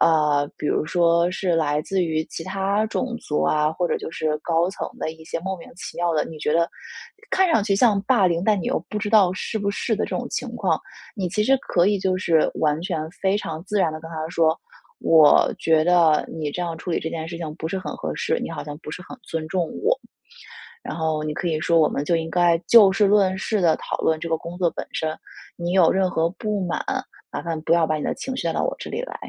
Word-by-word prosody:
呃， 150 -3 +3
比 - - -4
如 - - +1
说 170 +1 +3
是 185 -1 0
来 150 -2 +1
自 190 +2 0
于 160 -1 -1
其 165 - -7
他 195 +3 0
种 240 +2 -2
族 150 - -2
啊， 150 0 +2
或 175 +2 -1
者 - - +1
就 - - -6
是 155 -2 -1
高 170 +3 +1
层 195 - -5
的 - - -2
一 160 0 -15
些 160 - -4
莫 190 +2 -3
名 170 - -12
其 - - -8
妙 175 0 +1
的， 155 - +1
你 160 - -9
觉 150 - 0
得， 170 +1 +2 0.6
看 380 -1 +3
上 225 -10 +3
去 200 -1 +1
像 210 -2 +4
霸 200 -1 +3
凌， 170 -1 0
但 210 -2 +3
你 - - -5
又 - - +1
不 210 - -3
知 210 0 -3
道 200 -5 +5
是 205 +4 -3
不 200 -1 -1
是 220 +2 -1
的 - - 0
这 - - -7
种 - - -3
情 - - -3
况， - - 0 0.4
你 190 -3 -1
其 210 +4 0
实 270 +4 +4
可 175 -7 +1
以 205 0 +2
就 185 -1 0
是 165 -4 +3
完 150 0 +1
全 175 -2 -2
非 190 +3 0
常 160 -5 -5
自 205 +2 -1
然 165 -5 +2
地 155 - -6
跟 160 0 -10
他 160 -1 -4
说： 165 -2 +2 0.4
“我 155 -2 +5
觉 160 -1 +3
得 170 -3 +4
你 155 -2 -3
这 180 - -5
样 170 -2 -3
处 175 - -6
理 - - +1
这 160 - -3
件 160 0 -5
事 170 - -6
情 155 -3 -5
不 160 - -4
是 190 - -2
很 185 - -6
合 - - -4
适， 475 - 0
你 - - -4
好 150 -3 -5
像 145 -1 -7
不 - - -7
是 170 - -7
很 - - -8
尊 165 -5 -4
重 180 +1 0 0.2
我。” - - +3 0.9
然 - - -5
后 160 -2 -1
你 155 0 -2
可 175 +2 -3
以 160 -2 0
说： 165 +1 +3
“我 155 - +4
们 145 - -3
就 170 - +2
应 165 0 -2
该 175 0 +3
就 215 -5 +8
事 200 +1 +3
论 195 -2 +3
事 210 +3 -1
地 165 -4 +4
讨 - - -4
论 160 -1 +1
这 165 - -5
个 165 - +1
工 170 +2 -8
作 175 -2 +3
本 - - -5
身。 155 -1 -2 0.4
你 175 0 -3
有 180 -3 +5
任 190 0 +2
何 165 +1 +1
不 210 0 -3
满， 175 - -2 0.5
麻 - - -4
烦 165 -2 -3
不 165 - +2
要 170 -1 +3
把 155 - +1
你 150 - -4
的 - - -1
情 265 - -5
绪， - - -3
带 - - 0
到 - - 0
我 - - -1
这 - - -7
里 - - -2
来。” - - -7
170 Hz, 285 characters per minute, -23 LUFS, 160-195 Hz, 0.9 s, 就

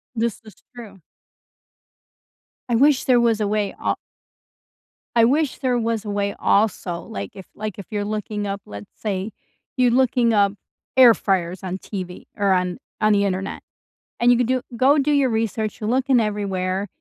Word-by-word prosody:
This 230 -1 -1
is 215 -4 -14 0.2
true. 210 -6 -11 1.7
I 240 - +2
wish 275 +2 +4
there 250 -2 +4
was 230 -2 +2
a 210 - 0
way 210 -1 -1
al - - 0 1.2
I 230 -1 +6
wish 290 +4 +1
there 255 -3 +1
was 225 -2 -1
a - - -4
way 200 0 -1
also. 195 -4 +1
Like, 100 -1 -7
if 190 - -10
like, 215 -2 -5
if 195 - -9
you 205 -1 -1
looking 210 0 -3
up, 200 0 -4
let's 100 0 -10
say 200 0 -3 0.5
you're 250 -1 +4
looking 245 -2 +3
up 200 -2 +3 0.4
air 255 -3 +8
fryers 185 -3 -1
on 185 0 -3
TV 185 -2 -7
or 200 -1 +2
on 180 -1 0 0.2
on 215 0 +4
the 200 0 +3
Internet, 195 0 -3 0.6
and 240 +1 +5
you 245 - +5
could 245 - +2
do 255 +1 0
go 275 +5 +4
do 285 +1 +1
your 280 -3 +3
research, 220 -1 -2
you're 215 0 -2
looking 260 0 +3
everywhere, 195 -3 -1
215 Hz, 175 wpm, -22 LUFS, 195-240 Hz, 1.7 s, air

